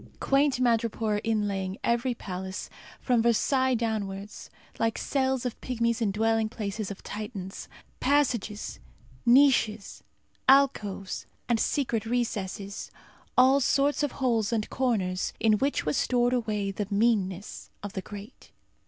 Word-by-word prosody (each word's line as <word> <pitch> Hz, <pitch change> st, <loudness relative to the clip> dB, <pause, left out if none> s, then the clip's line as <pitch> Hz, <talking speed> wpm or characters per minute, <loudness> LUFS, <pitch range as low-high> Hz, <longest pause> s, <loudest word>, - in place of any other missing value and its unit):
Quaint 275 Hz, -1 st, +2 dB
madrepore 225 Hz, -3 st, +1 dB
inlaying 200 Hz, -3 st, -1 dB
every 240 Hz, +1 st, +1 dB
palace, 190 Hz, -2 st, -6 dB, 0.3 s
from 245 Hz, -3 st, +2 dB
Versailles 260 Hz, +3 st, +2 dB
downwards, 210 Hz, -3 st, -3 dB, 0.3 s
like 225 Hz, 0 st, +1 dB
cells 265 Hz, -2 st, 0 dB
of 245 Hz, -, -4 dB
pygmies 235 Hz, -2 st, -1 dB
in 220 Hz, -, +2 dB
dwelling 225 Hz, +1 st, +1 dB
places 210 Hz, -2 st, -4 dB
of 200 Hz, -, -8 dB
Titans. 205 Hz, -3 st, -6 dB, 0.3 s
Passages, 250 Hz, -7 st, 0 dB, 0.5 s
niches, 240 Hz, -5 st, +4 dB, 0.5 s
alcoves, 215 Hz, -8 st, +2 dB, 0.2 s
and 235 Hz, -2 st, +2 dB
secret 230 Hz, -6 st, 0 dB
recesses. 205 Hz, -4 st, -3 dB, 0.5 s
All 260 Hz, +2 st, +6 dB
sorts 280 Hz, +3 st, +2 dB
of 290 Hz, -3 st, 0 dB
holes 230 Hz, -5 st, +1 dB
and 220 Hz, -2 st, 0 dB
corners, 200 Hz, -8 st, 0 dB
in 215 Hz, -2 st, +3 dB
which 280 Hz, +1 st, 0 dB
was 150 Hz, -1 st, 0 dB
stored 245 Hz, 0 st, +2 dB
away 210 Hz, -5 st, -1 dB
the 200 Hz, 0 st, -3 dB
meanness 200 Hz, -3 st, 0 dB
of 205 Hz, -, -6 dB
the 190 Hz, -, -3 dB
great. 205 Hz, +5 st, -11 dB
225 Hz, 125 wpm, -28 LUFS, 205-250 Hz, 0.5 s, All